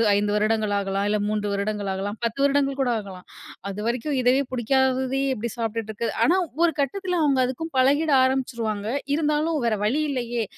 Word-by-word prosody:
5 205 0 +1
வருடங்கள் 215 0 +1
ஆகலாம். 195 0 -1
இல்ல 210 - +2
3 210 0 -1
வருடங்கள் 200 0 -2
ஆகலாம். 200 +2 -3
10 235 +3 -2
வருடங்கள் 280 -1 +2
கூட 260 -2 +1
ஆகலாம். 190 -3 -10 0.4
அதுவரைக்கும் 235 +8 -2
இதவே 250 +2 +3
புடிக்காததையே 265 +2 +1
எப்படி 235 -1 -4
சாப்ட்டுட்டு 225 -1 -3
இருக்கது. 220 +1 -3
ஆனா 350 - +4 0.3
ஒரு 340 -1 +5
கட்டத்துல 360 +6 -1
அவங்க 280 -3 +2
அதுக்கும் 315 +6 -4
பழகிட 285 +4 +3
ஆரம்பிச்சுருவாங்க. 235 -6 -1 0.3
இருந்தாலும் 305 +1 0
வேற 225 -2 +2
வழி 250 +9 +1
இல்லையே, 240 -3 -2
240 Hz, 160 wpm, -24 LUFS, 210-275 Hz, 0.4 s, ஒரு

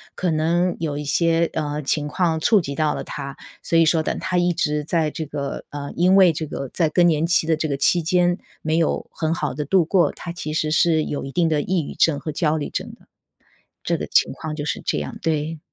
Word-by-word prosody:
可 180 -3 -1
能 170 +3 +1
有 150 -3 -2
一 150 - -4
些， 165 +3 +2
呃， 150 -1 -3
情 150 +2 0
况 165 0 0
触 210 +5 +4
及 140 -4 -5
到 150 0 0
了 - - -4
她。 140 -1 -6 0.3
所 165 - +1
以 165 - +6
说 160 0 +3
等 - - -2
她 185 -1 -1
一 175 0 +2
直 150 -3 -1
在 160 -1 0
这 160 - -5
个 140 -1 -5
呃， 145 -1 -6
因 185 +3 +4
为 185 -3 +7
这 155 +1 -4
个 135 -2 -5
在 165 -3 +2
更 175 +3 +3
年 165 -1 +2
期 165 -2 +2
的 160 -1 +1
这 155 - -1
个 140 - -1
期 170 +5 +2
间 175 +2 +2 0.2
没 155 +1 0
有 165 -2 0
很 160 0 -1
好 170 - -2
地 150 +1 -4
度 185 +4 +3
过， 175 +2 +2
她 170 - -7
其 155 -3 -5
实 155 -1 0
是 160 -1 +3
有 145 - -4
一 135 - -8
定 170 -2 +2
的 155 -2 +1
抑 180 +2 0
郁 - - -7
症 155 -3 +3
和 155 +2 -5
焦 150 0 +1
虑 150 -2 -3
症 - - -5
的。 - - -19 0.8
这 - - 0
个 - - -4
情 - - +2
况 155 -1 -6
就 145 - -4
是 150 - -2
这 - - 0
样， - - -5
对。 160 0 -1
160 Hz, 265 characters per minute, -22 LUFS, 150-170 Hz, 0.8 s, 为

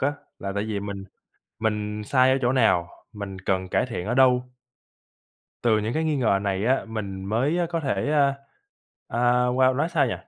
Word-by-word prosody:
á, 140 +2 +1 0.3
là 100 0 -4
tại 100 +1 -1
vì 105 -2 -3
mình 100 -1 -6 0.6
mình 105 -1 -2
sai 130 +3 +4
ở 135 - +2
chỗ 120 - +2
nào? 110 -9 +3 0.2
Mình 100 -2 -7
cần 95 0 -1
cải - - +1
thiện 115 -7 -5
ở 120 - -1
đâu? 125 -1 +5 1.2
Từ 115 -3 +3
những 110 +2 -2
cái 160 +1 0
nghi 155 -2 +1
ngờ 110 -7 +2
này 100 0 -1
á, 130 +2 +2
mình 100 -4 -5
mới, 125 - 0
a, 175 - +1
có 165 0 -2
thể, 145 0 -1
a, 140 -2 +3 0.7
a, 115 - -4 0.3
wow, 130 +1 +3
nói 155 +3 +1
sao 155 -5 +2
nhỉ? 120 - -1
115 Hz, 200 wpm, -25 LUFS, 100-135 Hz, 1.2 s, đâu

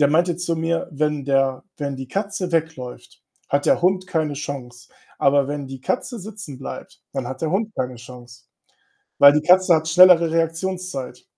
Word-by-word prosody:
der 145 - +5
meinte 170 +3 +2
zu 170 -1 -2
mir: 165 +2 -1
„Wenn 150 -1 -1
der 135 -1 +1
wenn 140 -2 -3
die 130 -1 -7
Katze 200 -1 -3
wegläuft, 160 -7 -4 0.3
hat 140 0 0
der - - +3
Hund 185 +1 +1
keine 155 -3 -1
Chance. 125 -4 -7 0.3
Aber 140 0 +3
wenn 145 0 -4
die 135 -1 -8
Katze 245 - -3
sitzen 200 -9 -9
bleibt, 135 - -9
dann 135 -3 -3
hat 130 +3 -7
der 160 - 0
Hund 215 +4 -1
keine 125 0 -2
Chance.“ 120 0 -13 0.7
Weil 140 0 +9
die 150 0 0
Katze 180 0 +6
hat 160 0 0
schnellere 170 0 +7
Reaktionszeit. 165 -3 -3
155 Hz, 175 wpm, -22 LUFS, 135-180 Hz, 0.7 s, Weil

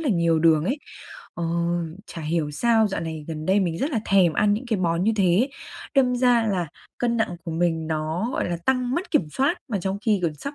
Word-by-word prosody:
là 310 - -1
nhiều 170 -5 +2
đường 160 -1 +4
ấy. 265 +9 -1 0.6
Ờ, 170 - -3 0.6
chả 170 - -8
hiểu 155 -1 -1
sao 225 +8 +3
dạo 195 - -3
này 160 -2 -5
gần 155 -1 -5
đây 195 +2 +3
mình 170 -3 -1
rất 290 - -1
là 230 - 0
thèm 190 -4 +4
ăn 205 +4 +3
những 235 +5 -5
cái 220 -5 0
món 170 0 0
như 225 - +3
thế, 195 +5 +3 0.5
đâm 255 -2 +3
ra 245 -2 +3
là 185 -4 0 0.3
cân 235 -1 0
nặng 220 -6 -1
của 170 - -4
mình 165 -1 0
nó, 160 +7 -2
gọi - - -1
là, 175 - -1
tăng 255 -1 +1
mất 360 +6 -3
kiểm 180 - +2
soát 275 - +1
mà 210 -5 -1
trong 190 +2 -2
khi 210 -3 +3
gần 165 -3 0
sắp 280 - -7
190 Hz, 235 wpm, -24 LUFS, 165-235 Hz, 0.6 s, đường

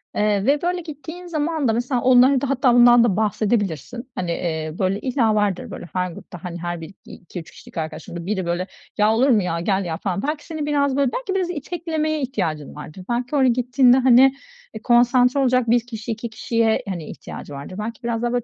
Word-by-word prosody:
eee, 210 -1 +1
ve, 285 +3 +3
böyle, 355 +1 -1
gittiğin 320 +2 -9
zaman 315 -3 -1
da 225 - +2
mesela 245 +2 -1
onlara 255 +1 +5
da 280 - -2
hatta 260 -2 +3
bundan 240 0 +7
da 220 -6 +2
bahsedebilirsin. 215 - -1
Hani, 180 -2 -2
eee, 160 -2 -3
böyle, 195 +1 0
illa 240 -4 +1
vardır, 205 -3 0
böyle, 175 - -8
her 180 -1 -1
grupta, 175 +1 -11
hani, 175 -1 -5
her 175 0 -4
biri 165 +4 -9
2-3 175 -2 -10
kişilik - - -14
arkadaşındır. 165 +1 -5
Biri, 190 -2 -2
böyle, 175 +2 -2 0.3
"Ya 210 +1 +4
olur 255 +5 +3
mu 220 -6 +4
ya, 170 -2 -2
gel 190 +2 0
ya!" 160 -2 -3
falan. 195 +1 -2
Belki 295 +2 -3
senin 315 -2 -4
biraz, 285 -2 +1
böyle, 275 -3 +2
belki 450 - -3
biraz 370 -2 0
iteklemeye 315 -1 -2
ihtiyacın 175 - -3
vardır. 150 +5 -9
Belki 245 +4 -1
oraya 270 -2 +4
gittiğinde, 250 +1 +4
hani, 260 +1 +6 0.4
e, 220 - -7
konsantre 245 +3 +4
olacak 255 -3 +2
1 240 +1 +5
kişi, 230 -1 -6
2 230 +1 -4
kişiye, 225 0 0
hani, 175 -5 -4
ihtiyacı 145 - -9
vardır. 140 +6 -8
Belki 230 +4 -5
biraz 235 -1 -2
daha, 240 0 0
böyle, 245 -1 0
235 Hz, 205 wpm, -22 LUFS, 190-270 Hz, 0.4 s, bundan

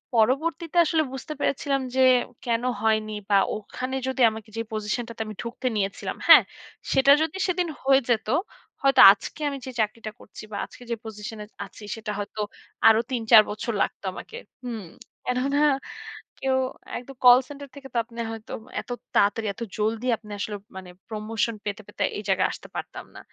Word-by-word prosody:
পরবর্তীতে 320 +9 +1
আসলে 320 0 +2
বুঝতে 265 +3 -6
পেরেছিলাম 275 -1 0
যে 260 - +3 0.4
কেন 235 -1 0 0.2
হয়নি, 215 -1 +1 0.2
বা 205 - +4 0.2
ওখানে 255 +5 -5
যদি 260 0 -2
আমাকে 220 0 -9
যে - - 0
পজিশন 215 +3 -2
টাতে 230 -1 -7
আমি 215 - -7
ঢুকতে 245 +2 -4
নিয়েছিলাম। 195 -2 -2
হ্যাঁ? - - +10 0.5
সেটা 270 +1 +5
যদি 320 +3 -1
সেদিন 360 -1 0 0.2
হয়ে 270 0 +5
যেত, 220 -2 +1 0.6
হয়তো 270 -1 +6
আজকে 205 +9 -5
আমি 280 - -4
যে 260 - -5
চাকরিটা 215 0 -1
করছি - - -12
বা 205 - -4
আজকে 245 - -14
যে - - +1
পজিশন 215 0 -7
এ - - -9 0.2
আছি 205 +2 -14
সেটা 220 -1 -5
হয়তো 205 +1 -4 0.5
আরো 220 0 +7
তিন 245 -3 -1
চার 220 - +11
বছর 215 +3 -3
লাগতো - - -2
আমাকে। 460 - -9 0.3
হুম, 230 -5 -5 0.4
কেননা 265 +3 0 0.8
কেউ 265 -1 +1 0.4
একদম 260 +2 -10
কল 245 0 +10
সেন্টার 285 0 -8
থেকে 275 -1 -10
তো - - -1
আপনি 235 0 -16
হয়তো 225 -1 -8 0.3
এত - - -20 0.3
তাড়াতাড়ি 210 +2 +3
এত 200 - -15 0.2
জলদি 220 +3 -1
আসলে 210 -1 -6 0.2
মানে 185 -1 -9 0.2
প্রমোশন 220 +1 -2
পেতে, 205 +1 -3
পেতে 205 - -3
এই 205 - -5
জায়গায় 190 -1 +3
আসতে - - -10
পারতাম - - -6
না। - - -9
230 Hz, 170 wpm, -25 LUFS, 215-265 Hz, 0.8 s, চার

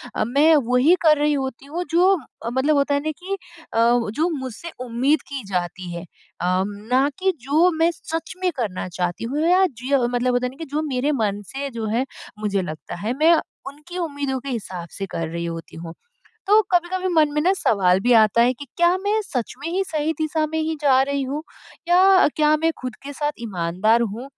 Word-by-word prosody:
अ, - - +1
मैं 295 +6 +5
वहीं 255 +8 +4
कर 305 -2 +6
रही 295 0 +2
होती 265 -2 -3
हूँ, 330 +5 -4
जो 360 +4 +4 0.4
मतलब 285 +4 +2
होता 280 0 +2
है 285 - +2
ना 310 - 0
कि 375 +2 -5 0.4
अ, - - -2 0.3
जो 315 +10 0
मुझसे 260 +6 -7
उम्मीद 260 +6 +1
की 275 -2 -5
जाती 180 0 -3
है 170 +1 -6 0.4
अम, 185 +2 +1 0.2
ना 265 +3 +4
कि 380 0 +2
जो 310 +8 +3
मैं 330 +1 +4
सच 325 +2 -5
में 365 - +2
करना 205 -8 -3
चाहती 175 +1 -3
हूँ 295 +7 -1
या 375 +1 +5
जीय 260 0 -1
मतलब 245 +1 0
होता 245 +1 +1
नहीं 260 +2 -10
कि 325 - -5
जो 305 - +1
मेरे 265 +2 0
मन 205 -1 -1
से 280 +1 -3
जो 230 -2 -4
है 255 - +1 0.3
मुझे 205 -2 0
लगता 155 -2 -7
है। 215 +7 -3
मैं 320 +3 +5 0.3
उनकी 300 +6 -9
उम्मीदों 285 -5 -2
के 275 +2 -7
हिसाब 185 -8 -5
से 195 - -5
कर 165 -1 -3
रही 170 +1 -4
होती 165 0 -7
हूँ। 165 0 -8 0.5
तो 420 +2 +6
कभी-कभी 365 +1 +1
मन 310 -2 +4
में 300 - 0
ना 370 +4 +4
सवाल 190 - +2
भी 245 +5 +2
आता 215 +2 +4
है 245 +2 +4
कि 285 +3 -10
क्या 345 +1 +4
मैं 410 +3 0
सच 250 - -3
में 290 +4 -5
ही 380 +2 +1
सही 310 0 -1
दिशा 310 0 0
में 320 - 0
ही 320 0 -1
जा 265 -3 +5
रही 280 0 -1
हूँ 285 +4 -4 0.5
या 370 +2 +6
क्या 305 0 +4
मैं 325 +1 +2
खुद 255 -1 -5
के 285 - -6
साथ 295 +1 -1
ईमानदार 195 +2 +1
हूँ? 230 +2 -4
275 Hz, 210 wpm, -22 LUFS, 225-320 Hz, 0.5 s, कर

